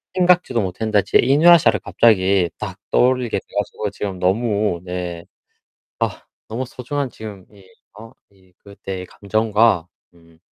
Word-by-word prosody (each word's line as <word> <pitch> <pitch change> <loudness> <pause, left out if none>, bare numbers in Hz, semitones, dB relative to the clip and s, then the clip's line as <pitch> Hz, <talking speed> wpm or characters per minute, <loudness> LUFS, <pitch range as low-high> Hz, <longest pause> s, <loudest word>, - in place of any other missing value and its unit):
생각지도 180 -9 +2
못했는데 105 +2 0
제 - - +3
이누야샤 155 +6 +6
를 - - 0
갑자기 95 -5 +2
딱 95 -3 -6
떠올리게 125 -2 +2
돼 - - -24
가지고 105 0 -3
지금 95 -3 -5
너무 100 -1 0
네 90 -2 -5 0.8
아 - - -2 0.3
너무 115 +4 -3
소중한 135 +3 -4
지금 105 -5 -10
이 100 -2 -18 0.3
어 115 +1 -11 0.2
이 95 -2 -27
그때의 95 -2 -7
감정과 110 -2 +1 0.3
음 85 -1 -23
105 Hz, 280 characters per minute, -20 LUFS, 95-120 Hz, 0.8 s, 이누야샤